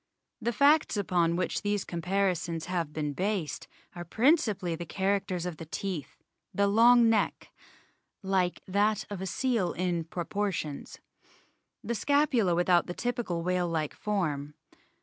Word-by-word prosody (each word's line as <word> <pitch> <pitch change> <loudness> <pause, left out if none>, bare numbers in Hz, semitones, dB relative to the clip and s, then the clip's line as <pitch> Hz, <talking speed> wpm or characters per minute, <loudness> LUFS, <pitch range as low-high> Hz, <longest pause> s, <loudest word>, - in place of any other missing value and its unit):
The 235 +1 0
facts 285 +2 +4
upon 175 -4 +1
which 180 +1 -1
these 205 -1 -1
comparisons 175 -2 -1
have 175 -4 -2
been 150 -1 -3
based 190 -2 -2 0.3
are 175 - -6
principally 215 - +2
the 170 - -6
characters 190 -2 -1
of 175 -3 -4
the 165 - -8
teeth, 170 -5 -5 0.3
the 200 - +1
long 230 +3 +6
neck 225 -2 0 0.7
"like 190 -2 0
that 205 +2 +1
of 195 -2 -5
a 190 - -3
seal 230 -2 0
in 175 -2 -1
proportions" 175 -3 -3 0.9
the 235 - -2
scapula 250 - +2
without 175 0 +3
the 175 - -5
typical 240 -9 -2
whale 180 0 0
like 160 -3 -2
form. 150 -8 -2
185 Hz, 135 wpm, -29 LUFS, 170-210 Hz, 0.9 s, long